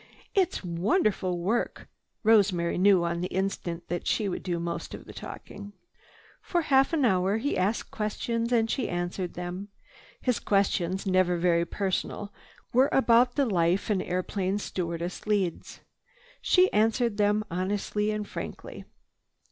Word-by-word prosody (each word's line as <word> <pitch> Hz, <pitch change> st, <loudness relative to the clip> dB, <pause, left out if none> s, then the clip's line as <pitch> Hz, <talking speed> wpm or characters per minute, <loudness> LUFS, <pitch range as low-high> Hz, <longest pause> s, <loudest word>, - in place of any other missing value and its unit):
"It's 380 Hz, -, +1 dB
wonderful 185 Hz, -, 0 dB
work!" 200 Hz, +8 st, -1 dB, 0.4 s
Rosemary 195 Hz, -6 st, +3 dB
knew 190 Hz, -2 st, +5 dB
on 170 Hz, 0 st, -1 dB
the 180 Hz, -, -1 dB
instant 185 Hz, -3 st, -3 dB
that 175 Hz, -, -3 dB
she 215 Hz, -, +1 dB
would 185 Hz, -, -3 dB
do 175 Hz, -2 st, -2 dB
most 170 Hz, 0 st, -4 dB
of -, -, -11 dB
the -, -, -11 dB
talking. 205 Hz, 0 st, -9 dB, 0.7 s
For 345 Hz, -2 st, -1 dB
half 270 Hz, -2 st, +4 dB
an 305 Hz, -5 st, +2 dB
hour 190 Hz, -1 st, +2 dB
he 275 Hz, +6 st, -1 dB
asked 200 Hz, +5 st, -1 dB
questions 230 Hz, +2 st, -2 dB
and 225 Hz, -2 st, +3 dB
she 250 Hz, +3 st, -1 dB
answered 175 Hz, +1 st, -3 dB
them. 180 Hz, +3 st, -5 dB, 0.5 s
His 250 Hz, -4 st, 0 dB
questions, 195 Hz, -2 st, 0 dB
never 185 Hz, -2 st, +2 dB
very 170 Hz, -1 st, +2 dB
personal, 200 Hz, +2 st, -3 dB, 0.4 s
were 260 Hz, +3 st, +5 dB
about 245 Hz, -1 st, +4 dB
the 280 Hz, -, +3 dB
life 180 Hz, -1 st, +1 dB
an 195 Hz, -3 st, +1 dB
airplane 185 Hz, +2 st, -1 dB
stewardess 175 Hz, -2 st, -4 dB
leads. 195 Hz, -5 st, -1 dB, 0.6 s
She 365 Hz, 0 st, +4 dB
answered 225 Hz, +1 st, +2 dB
them 210 Hz, 0 st, +2 dB
honestly 205 Hz, +3 st, -1 dB
and 210 Hz, -1 st, -2 dB
frankly. -, -, -7 dB
200 Hz, 140 wpm, -28 LUFS, 180-225 Hz, 0.7 s, knew